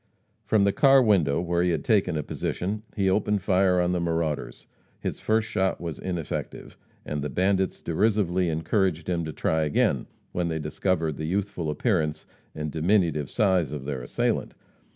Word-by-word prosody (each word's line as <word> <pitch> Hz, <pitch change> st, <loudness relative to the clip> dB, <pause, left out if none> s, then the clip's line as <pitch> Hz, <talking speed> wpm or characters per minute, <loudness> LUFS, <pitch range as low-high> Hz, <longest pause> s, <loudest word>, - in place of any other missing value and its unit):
From 110 Hz, -2 st, +3 dB
the 100 Hz, 0 st, +3 dB
car 135 Hz, -1 st, +6 dB
window, 95 Hz, -, +3 dB
where 85 Hz, 0 st, 0 dB
he 90 Hz, -, +2 dB
had 85 Hz, -, -1 dB
taken 95 Hz, -7 st, +2 dB
a 75 Hz, -, -2 dB
position, 100 Hz, +8 st, -3 dB
he 100 Hz, -2 st, +1 dB
opened 100 Hz, +1 st, +1 dB
fire 95 Hz, -2 st, +3 dB
on 90 Hz, 0 st, +2 dB
the 90 Hz, -, 0 dB
marauders. 80 Hz, -3 st, -2 dB, 0.3 s
His -, -, -4 dB
first 110 Hz, 0 st, +1 dB
shot 95 Hz, -3 st, 0 dB
was 85 Hz, -3 st, -5 dB
ineffective, 85 Hz, -4 st, -5 dB, 0.3 s
and 75 Hz, -1 st, -3 dB
the 75 Hz, -, -3 dB
bandits 95 Hz, +5 st, 0 dB
derisively 95 Hz, -1 st, +1 dB
encouraged 80 Hz, +1 st, 0 dB
him 85 Hz, -2 st, 0 dB
to 80 Hz, -, -4 dB
try 80 Hz, +2 st, 0 dB
again, 75 Hz, -2 st, +1 dB, 0.2 s
when 90 Hz, -1 st, -1 dB
they 80 Hz, -1 st, -2 dB
discovered 80 Hz, 0 st, -1 dB
the 80 Hz, -, -4 dB
youthful 95 Hz, -3 st, -2 dB
appearance 75 Hz, -, 0 dB, 0.3 s
and 75 Hz, -1 st, -4 dB
diminutive 80 Hz, -4 st, +1 dB
size 95 Hz, -8 st, +2 dB
of 75 Hz, -3 st, -5 dB
their 70 Hz, -3 st, -3 dB
assailant. -, -, -1 dB
90 Hz, 170 wpm, -26 LUFS, 80-100 Hz, 0.3 s, car